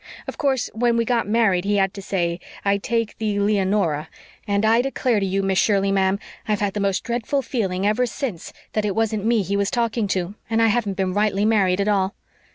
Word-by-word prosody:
Of - - -5
course, 270 -5 0
when 235 +1 +1
we 230 - +1
got 235 -3 0
married 205 -5 +2
he 205 +1 +1
had 195 -1 +2
to 200 - -7
say, 175 -3 -1 0.3
'I 200 0 +3
take 230 +1 -1
thee, 210 -2 -1
Leonora,' 195 -6 +1 0.4
and 200 +1 +1
I 225 +2 +4
declare 255 -3 0
to 195 - 0
you, 195 +1 0
Miss 195 -1 +1
Shirley, 200 -2 +2
ma'am, 190 0 +2 0.3
I've 210 -1 +1
had 205 -2 -1
the 210 - -3
most 200 -1 0
dreadful 240 +4 -1
feeling 195 -7 -2
ever 225 +4 +2
since 230 - -5 0.2
that 215 - 0
it 205 -2 -1
wasn't 220 -2 0
me 230 -2 +2
he 200 +2 -2
was 200 0 +1
talking 230 -3 0
to 185 0 -2 0.2
and 225 0 +1
I 225 0 +4
haven't 210 -3 0
been 190 -1 0
rightly 205 0 +1
married 195 -4 +2
at 200 - +1
all. 195 -2 +1
205 Hz, 220 wpm, -22 LUFS, 195-225 Hz, 0.4 s, I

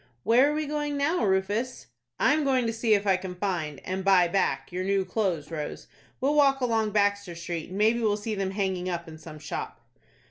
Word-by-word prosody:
"Where 250 +5 +5
are - - -2
we 310 0 -1
going 295 0 -2
now, 290 +2 +1
Rufus?" 205 +5 0 0.3
"I 280 - +4
am 305 0 +1
going 260 -3 +2
to 230 - -1
see 225 -1 +2
if 200 0 -1
I 190 -2 +3
can 185 -1 -7
find, 175 -7 -3
and 190 +1 -3
buy 185 -2 +5
back, 135 -7 0
your 180 +1 -3
new 195 0 +1
clothes, 180 -6 -2
Rose. 150 -2 -5 0.3
We'll 275 +3 +1
walk 275 -2 +4
along 225 -4 +1
Baxter 200 -3 0
Street, 170 -1 -5
and 185 - -6
maybe 220 +3 +3
we'll 215 -3 +1
see 215 +1 -4
them 195 -2 -1
hanging 190 -2 -2
up 170 -1 -4
in 160 -1 -10
some 155 -2 -10
shop." 150 0 -6
200 Hz, 215 wpm, -27 LUFS, 180-235 Hz, 0.3 s, Where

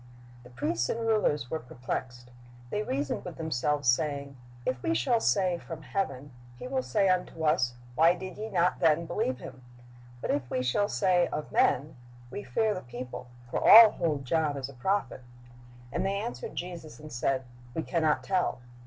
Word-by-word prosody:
The 125 - -14
priests 120 -2 -1
and 230 - -1
rulers 210 - +1
were 160 - -1
perplexed. 125 -1 -6 0.4
"They 210 - 0
reasoned 140 -8 -2
with 180 - -8
themselves, 150 -3 -1
saying, 140 +1 +1 0.3
If 125 -1 -1
we 110 - 0
shall 130 - +2
say, 185 -5 +2
From 160 -2 -8
heaven. 145 -9 -3 0.3
He - - -7
will 260 0 0
say 205 -5 +1
unto 180 -3 0
us. 125 -5 +2 0.2
Why 165 +6 +5
did 185 0 -7
ye 215 +1 -5
not 180 -3 +1
then 165 0 +3
believe 130 -5 -1
him? 130 - -10 0.6
But - - -2
if 135 -4 -1
we 125 - -1
shall 205 +12 +1
say. 180 -3 +3
Of 150 - -5
men, 145 +2 +2 0.3
we 205 - -5
fear 220 -2 +1
the 185 - -5
people; 125 0 -8 0.2
for - - 0
all 225 -1 +10
hold 150 -6 -1
John 150 0 +1
as 135 -1 -4
a - - -11
prophet. 130 +1 -1 0.7
And - - -1
they 195 +1 0
answered 125 -9 -5
Jesus, 170 -4 -6
and 155 -2 -10
said. 130 +2 0 0.3
We 160 - -1
can 170 0 -1
not 155 -1 +2
tell. 185 -8 0
155 Hz, 180 wpm, -29 LUFS, 130-185 Hz, 0.7 s, all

